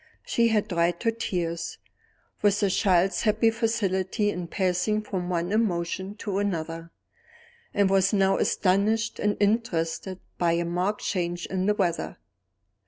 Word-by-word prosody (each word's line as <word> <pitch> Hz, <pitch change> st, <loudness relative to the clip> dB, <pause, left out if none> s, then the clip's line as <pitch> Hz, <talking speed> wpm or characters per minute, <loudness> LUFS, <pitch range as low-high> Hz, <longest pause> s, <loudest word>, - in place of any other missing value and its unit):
She 235 Hz, 0 st, +2 dB
had 220 Hz, -2 st, +1 dB
dried 170 Hz, +1 st, 0 dB
her 230 Hz, -, +3 dB
tears, 170 Hz, -7 st, -3 dB, 0.6 s
with 205 Hz, 0 st, +3 dB
a 195 Hz, -, +3 dB
child's 185 Hz, -1 st, +2 dB
happy 220 Hz, +1 st, +3 dB
facility 205 Hz, -2 st, 0 dB
in 180 Hz, -2 st, -5 dB
passing 190 Hz, +4 st, 0 dB
from 185 Hz, -4 st, -4 dB
one 175 Hz, +1 st, -1 dB
emotion 190 Hz, -2 st, -1 dB
to 200 Hz, -2 st, -3 dB
another, 165 Hz, -4 st, -3 dB, 0.8 s
and 200 Hz, -2 st, +3 dB
was 195 Hz, 0 st, +3 dB
now 195 Hz, -2 st, +3 dB
astonished 215 Hz, +4 st, +1 dB
and 205 Hz, 0 st, 0 dB
interested 190 Hz, -4 st, 0 dB, 0.2 s
by 170 Hz, -1 st, +3 dB
a 170 Hz, 0 st, 0 dB
marked 180 Hz, +5 st, -1 dB
change 175 Hz, -2 st, -2 dB
in 190 Hz, 0 st, -2 dB
the 210 Hz, -, +3 dB
weather. 175 Hz, -5 st, -1 dB
190 Hz, 140 wpm, -26 LUFS, 175-210 Hz, 0.8 s, her